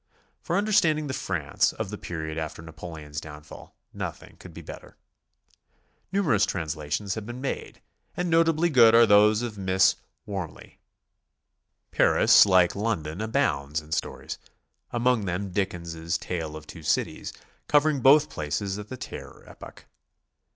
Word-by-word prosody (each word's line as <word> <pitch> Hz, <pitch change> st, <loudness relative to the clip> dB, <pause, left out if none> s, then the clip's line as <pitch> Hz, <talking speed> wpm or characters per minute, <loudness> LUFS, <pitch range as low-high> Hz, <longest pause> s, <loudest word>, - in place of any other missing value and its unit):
For 175 Hz, -, -1 dB
understanding 170 Hz, -7 st, +2 dB
the 135 Hz, -, -4 dB
France 85 Hz, -, 0 dB
of 95 Hz, -, -5 dB
the 105 Hz, -, -5 dB
period 80 Hz, -2 st, -5 dB
after 80 Hz, 0 st, -5 dB
Napoleon's 80 Hz, -2 st, -8 dB
downfall, 75 Hz, -1 st, -12 dB, 0.2 s
nothing -, -, -7 dB
could -, -, -11 dB
be -, -, -11 dB
better. -, -, -11 dB, 1.1 s
Numerous 160 Hz, -, +2 dB
translations 80 Hz, +1 st, -2 dB
have 110 Hz, -1 st, -6 dB
been 120 Hz, +1 st, -6 dB
made, 135 Hz, -, -5 dB, 0.3 s
and 180 Hz, -, -1 dB
notably 165 Hz, 0 st, +3 dB
good 115 Hz, -4 st, +7 dB
are 115 Hz, 0 st, +8 dB
those 105 Hz, +1 st, +5 dB
of 110 Hz, -4 st, -5 dB
Miss 95 Hz, 0 st, +3 dB, 0.3 s
W'orme 95 Hz, -6 st, -4 dB
ley. -, -, -16 dB, 1.1 s
Paris, -, -, +6 dB
like 90 Hz, -2 st, +4 dB
London, 100 Hz, -5 st, -2 dB
abounds 80 Hz, -, 0 dB
in 75 Hz, 0 st, -15 dB
stories, -, -, -4 dB, 0.5 s
among 120 Hz, -2 st, +1 dB
them 95 Hz, +2 st, -3 dB
Dickens' 85 Hz, -4 st, -2 dB
"Tale 80 Hz, -4 st, -4 dB
of 80 Hz, 0 st, -9 dB
Two 80 Hz, -, -11 dB
Cities," 75 Hz, -, -1 dB, 0.4 s
covering 150 Hz, -2 st, +3 dB
both 145 Hz, +4 st, +6 dB
places 95 Hz, +7 st, -3 dB
at 105 Hz, -, -9 dB
the 130 Hz, -, -6 dB
Terror -, -, -9 dB
epoch. -, -, -13 dB
100 Hz, 140 wpm, -26 LUFS, 80-120 Hz, 1.1 s, are